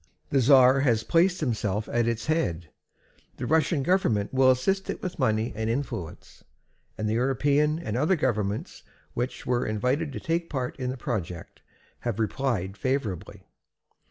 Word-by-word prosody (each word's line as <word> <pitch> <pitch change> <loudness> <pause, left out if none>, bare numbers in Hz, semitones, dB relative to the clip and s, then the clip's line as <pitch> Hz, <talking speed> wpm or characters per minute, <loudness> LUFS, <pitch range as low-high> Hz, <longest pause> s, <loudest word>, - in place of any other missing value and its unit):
The 140 - +3
czar 130 +1 +6
has 120 -5 +2
placed 180 +2 +2
himself 105 -3 -1
at 120 -1 0
its 115 -1 -1
head, 90 - -1 0.7
the - - -4
Russian 160 -2 +2
government 130 - +1
will 130 0 +5
assist 190 +10 +1
it - - -3
with 180 -2 -5
money 110 -3 +1
and 110 +1 -2
influence, 115 - -5 0.5
and 110 - -2
the 105 - 0
European 140 +5 +2
and 115 -10 -4
other 150 +9 +2
governments 110 - -2 0.3
which 125 +2 -3
were 125 -1 +1
invited 125 +8 -1
to - - -4
take 165 +1 -2
part 130 -4 -3
in 125 -1 -2
the 130 - -4
project 95 - -5 0.4
have 120 -4 -3
replied 110 -4 -1
favorably. 130 - -3
125 Hz, 155 wpm, -26 LUFS, 110-145 Hz, 0.7 s, czar